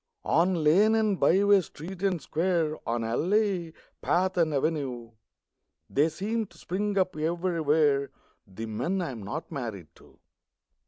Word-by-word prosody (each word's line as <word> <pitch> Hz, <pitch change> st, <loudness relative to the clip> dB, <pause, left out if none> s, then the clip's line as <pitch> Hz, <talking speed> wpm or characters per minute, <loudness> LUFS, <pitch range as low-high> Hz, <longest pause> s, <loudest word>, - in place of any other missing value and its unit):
On 170 Hz, 0 st, +2 dB
lane 200 Hz, +9 st, +5 dB
and 215 Hz, -4 st, +1 dB
byways, 195 Hz, 0 st, +4 dB
street 175 Hz, +5 st, -9 dB
and 190 Hz, -3 st, +1 dB
square, 160 Hz, 0 st, 0 dB
On 115 Hz, 0 st, -1 dB
alley, 180 Hz, -, 0 dB, 0.3 s
path 185 Hz, +1 st, +1 dB
and 165 Hz, -3 st, +2 dB
avenue, 135 Hz, -6 st, -2 dB, 0.8 s
They 150 Hz, +4 st, +3 dB
seem 210 Hz, +7 st, -2 dB
to -, -, -20 dB
spring 200 Hz, +3 st, -2 dB
up 185 Hz, -2 st, +1 dB
everywhere 155 Hz, -4 st, +1 dB, 0.4 s
The 100 Hz, +4 st, -7 dB
men 125 Hz, -, -2 dB
I 165 Hz, -, -3 dB
am 115 Hz, -4 st, -8 dB
not 105 Hz, -, -6 dB
married 110 Hz, -, -5 dB
to. -, -, -20 dB
165 Hz, 140 wpm, -27 LUFS, 140-190 Hz, 0.8 s, lane